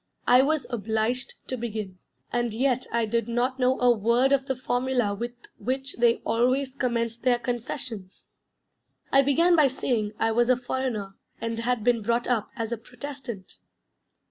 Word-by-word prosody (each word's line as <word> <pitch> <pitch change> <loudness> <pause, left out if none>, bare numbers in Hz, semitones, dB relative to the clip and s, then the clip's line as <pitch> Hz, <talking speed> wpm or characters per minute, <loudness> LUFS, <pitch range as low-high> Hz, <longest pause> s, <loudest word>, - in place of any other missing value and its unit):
I 250 +1 +7
was 300 +1 +1
obliged 225 +3 -1
to 255 - -2
begin, 215 -6 -5 0.3
and 240 -2 0
yet 255 +1 +1
I 235 -1 +1
did 230 +1 -1
not 250 +3 0
know 255 +1 +2
a 245 0 +5
word 235 +5 +2
of 275 -1 +2
the 265 - 0
formula 245 -3 0
with 235 +4 -4 0.3
which 265 +2 -3
they 235 -1 +3
always 255 +3 +1
commence 235 -4 -1
their 245 +1 +2
confessions!... 235 -4 -5 0.9
I 275 - +6
began 330 +6 +4
by 305 -4 +6
saying 235 -5 -1
I 225 - +1
was 240 +2 +2
a 255 - +5
foreigner 245 -6 -3 0.2
and 230 0 -3
had 240 -1 0
been 235 -1 +3
brought 235 +3 0
up 235 -4 0
as 230 -2 -3
a 235 - -2
Protestant. 245 -4 -8
240 Hz, 165 wpm, -26 LUFS, 230-260 Hz, 0.9 s, I